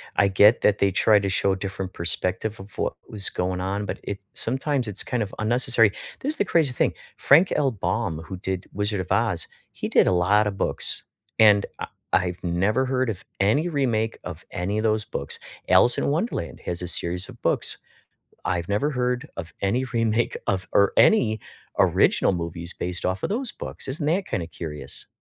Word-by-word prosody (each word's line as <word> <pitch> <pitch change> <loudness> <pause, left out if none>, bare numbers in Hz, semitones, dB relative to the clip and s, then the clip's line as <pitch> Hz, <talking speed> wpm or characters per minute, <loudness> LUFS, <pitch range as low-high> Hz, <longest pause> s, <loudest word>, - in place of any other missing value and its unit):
I 100 - +4
get 100 +4 +5
that 105 0 +3
they 100 -1 +3
tried 105 +1 +4
to 100 - 0
show 100 0 +1
a - - -1
different 95 -1 -5
perspective 90 +5 -1
of 95 +2 -12
what - - -1 0.2
was 100 -2 -1
going 90 0 -2
on, 100 +2 -2
but - - -5
it 100 - -5
sometimes 135 +1 0
it's 100 -2 -1
kind 125 -3 -1
of 100 - -8
unnecessary, 120 -1 +4 0.3
this 290 +3 0
is - - -5
the 205 - +1
crazy 160 -8 +2
thing, - - +1 0.2
Frank 165 +7 +5
L. 135 -3 +2
Baum, 90 -4 -2
who 95 - -6
did 95 0 -4
Wizard 105 -1 -1
of 90 - -8
Oz, 100 -4 +1 0.2
he - - -5
did - - +4
a - - +4
lotta 105 +4 +3
books, 100 - +1 0.4
and 105 -2 +6
I - - -4 0.3
I've 90 -1 +1
never 95 +9 +1
heard 130 -1 0
of 105 -2 -5 0.2
any 125 - +3
remake 120 -8 0
of 90 0 -8
any 95 +4 -2
of 110 - -1
those 110 -1 +2
books. 70 - -4 0.3
Alice 120 - +5
in - - 0
Wonderland 155 - -2
has 85 0 -3
a 90 - -4
series 90 +1 0
of - - -13
books, - - +1 0.7
I've 85 -1 -1
never 105 +9 +1
heard 125 +2 -1
of 85 -3 -7
any 120 +7 +1
remake 115 -1 +1
of 95 -2 -1
or 100 -1 +4
any 110 - +4 0.4
original - - +3
movies 85 0 -4
based 90 0 -5
off 95 +1 -1
of - - 0
those 240 +4 -2
books, - - -6
isn't 145 +3 -1
that 180 +5 +1
kinda 85 -3 -3
curious? 75 -3 -8
105 Hz, 195 wpm, -24 LUFS, 95-125 Hz, 0.7 s, and